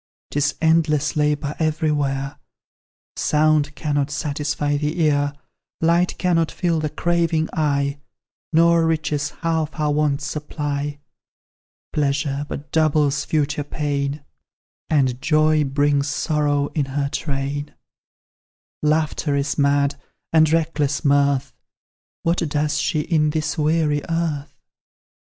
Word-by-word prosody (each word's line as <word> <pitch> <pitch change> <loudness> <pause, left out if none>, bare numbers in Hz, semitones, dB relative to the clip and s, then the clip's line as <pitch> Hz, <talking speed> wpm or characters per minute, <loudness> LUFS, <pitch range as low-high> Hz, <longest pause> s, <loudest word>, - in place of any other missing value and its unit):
'Tis 145 0 +1
endless 160 -2 +2
labour 150 -1 0
everywhere! 150 -4 -1 0.8
Sound 150 -1 +2
cannot 145 -2 -1
satisfy 145 0 -1
the 150 +4 -2
ear, 145 -2 +2 0.5
Light 170 +2 +2
cannot 165 -3 +1
fill 170 -2 0
the 155 -1 -1
craving 170 -1 0
eye, 140 -2 0 0.5
Nor 165 0 +4
riches 150 -2 0
half 160 -1 -1
our 150 -1 +1
wants 145 -1 0
supply, 145 -1 -3 1.0
Pleasure 145 0 0
but 145 +2 -7
doubles 150 -2 +2
future 150 -1 0
pain, 145 -1 -3 0.6
And 130 -4 +1
joy 155 -1 +3
brings 140 +1 +1
sorrow 145 -1 0
in 150 -3 -1
her 140 +1 -2
train; 140 0 -3 1.1
Laughter 155 -1 +1
is 140 +1 -1
mad, 140 0 +2 0.3
and 155 -1 +5
reckless 150 -4 0
mirth 140 -1 +2 0.7
What 170 +1 +1
does 150 -1 0
she 155 0 0
in 155 -1 +1
this 150 -1 -1
weary 155 -1 +1
earth? 155 -4 -1
150 Hz, 110 wpm, -22 LUFS, 145-155 Hz, 1.1 s, and